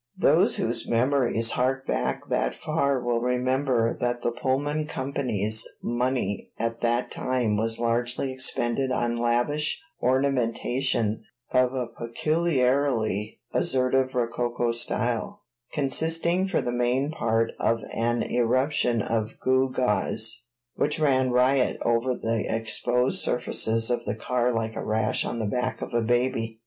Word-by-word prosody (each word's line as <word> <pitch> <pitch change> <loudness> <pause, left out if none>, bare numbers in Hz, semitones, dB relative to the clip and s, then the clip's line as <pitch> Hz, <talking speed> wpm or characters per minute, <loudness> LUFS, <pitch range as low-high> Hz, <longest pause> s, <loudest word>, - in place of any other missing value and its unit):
Those - - +4
whose - - -1
memories 120 -2 +2
hark 135 +1 0
back - - -2
that - - 0
far 140 -4 0
will 120 -1 0
remember 125 -1 +1
that 120 0 -1
the 120 - +1
Pullman 145 +5 -1
Company's 120 -7 -1
money 120 -4 -2
at 115 +1 -3
that 120 +1 0
time 125 -4 -1
was 115 +1 0
largely 120 +3 0
expended 130 0 0
on 120 -2 0
lavish 120 +6 +1 0.2
ornamentation 125 -3 +1 0.3
of 125 0 +2
a 125 -1 -1
peculiarly 125 - 0
assertive 130 0 +1
rococo 120 0 -1
style, 120 - -1 0.3
consisting 165 +6 +1
for 190 - 0
the 120 - -2
main 125 +4 0
part 115 -6 0
of 115 0 +1
an 120 +1 0
eruption 125 -1 +1
of 110 -1 -2
gew 130 0 +2
gaws 120 -3 0 0.3
which 150 - 0
ran 130 -4 +2
riot 125 +1 +2
over 120 +2 +1
the 115 -2 -1
exposed 125 - 0
surfaces 115 -1 +1
of 120 -1 -1
the - - -2
car 125 +2 0
like 115 -1 -2
a - - -4
rash 110 +1 +1
on - - -3
the 110 - -2
back 125 +4 -2
of - - -7
a 120 - +2
baby. 115 -1 0
125 Hz, 135 wpm, -26 LUFS, 115-130 Hz, 0.3 s, Those